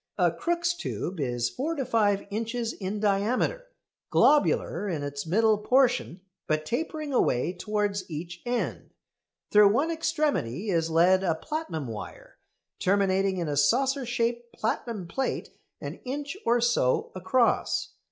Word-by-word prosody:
A 175 -3 +3
Crookes' 345 - 0
tube 190 - -4
is 120 -3 0
four 315 +5 -2
to 275 -4 -2
five 205 -4 +2
inches 230 +2 -2
in 200 +1 -4
diameter, 220 - 0 0.4
globular 210 - +3
in 155 -5 -2
its 145 +2 -5
middle 215 +4 +3
portion, 245 -6 +2 0.3
but 155 0 0
tapering 305 - -3
away 165 - +2
towards 205 0 -2
each 170 +2 -6
end. 245 0 -3 0.6
Through 210 -1 +7
one 300 +8 +1
extremity 300 - -1
is 165 -2 +1
led 180 +4 +4
a 170 -4 +1
platinum 300 - -4
wire, 110 -4 -9 0.4
terminating 195 0 +2
in 170 -2 -2
a 145 - -1
saucer 260 - +2
shaped 235 0 -1
platinum 215 -3 -3
plate 265 +10 -2 0.3
an - - -7
inch 285 +4 -4
or 240 +1 +4
so 235 - +1
across. 235 +6 +1
210 Hz, 135 wpm, -27 LUFS, 175-255 Hz, 0.6 s, Through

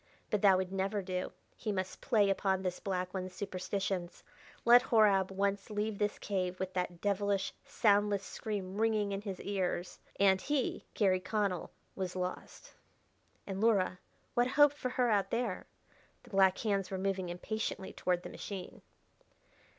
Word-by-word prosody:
But 210 - +1
that 195 -2 +6
would 185 0 -2
never 195 +1 -1
do: 185 0 -3 0.2
he 215 - -3
must 185 -2 -3
play 210 -7 +3
upon 190 -1 0
this 180 -1 -2
black 185 -2 -2
one's 185 -1 -4
superstitions. 190 -2 -3 0.4
Let 240 +1 +9
Horab 205 -4 +5
once 195 +1 -1
leave 210 0 -2
this 210 0 0
cave 185 -2 -2
with 190 0 -3
that 180 -2 -3
devilish, 200 -1 0
soundless 205 -2 +2
scream 195 -1 -4
ringing 215 -2 +2
in 195 0 -2
his 195 -3 -5
ears 185 -3 -2 0.2
and 190 -1 +5
he, 290 -3 -1
Garry 190 -3 +3
Connell, 200 -2 -1 0.3
was 185 -2 -3
lost. 180 0 -5 0.7
And 195 0 -4
Luhra! 195 -5 +3 0.3
what 240 0 +3
hope 290 +2 +5
for 275 -3 -3
her 250 -2 +1
out 200 -2 +2
there?... 230 -5 -2 0.6
The 245 - -17
black 190 -1 +4
hands 200 -4 0
were 190 - -3
moving 190 -1 -1
impatiently 190 +2 -4
toward 180 -1 0
the - - -6
machine.... 190 -3 -7
195 Hz, 155 wpm, -33 LUFS, 185-210 Hz, 0.7 s, Let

